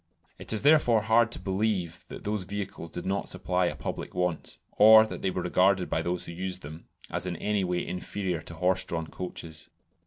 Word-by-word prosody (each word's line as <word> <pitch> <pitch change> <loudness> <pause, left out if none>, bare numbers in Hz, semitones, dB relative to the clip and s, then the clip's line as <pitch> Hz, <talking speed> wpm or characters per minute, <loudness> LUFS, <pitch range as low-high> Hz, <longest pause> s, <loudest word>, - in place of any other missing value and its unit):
It - - -3
is 110 +1 +2
therefore 140 -7 +5
hard 110 +1 +3
to - - -4
believe 95 -3 -2
that - - -9
these 105 -2 -2
vehicles 95 -3 -6
did 90 - -6
not 100 +1 -1
supply 90 -1 0
a - - -3
public - - -6
want, 90 -3 -2
or 110 +1 +8
that - - -7
they 95 - 0
were 90 -1 -3
regarded 95 +1 +2
by 80 - +1
those 85 +1 -2
who - - -7
used 90 +1 -5
them 80 +3 -10 0.2
as - - 0
in 90 - -3
any 105 +3 -1
way 90 -1 -1
inferior 90 -1 -3
to 85 - -8
horse 90 +2 +1
drawn 80 -3 -4
coaches. 80 -2 -8
90 Hz, 205 wpm, -28 LUFS, 90-105 Hz, 0.2 s, or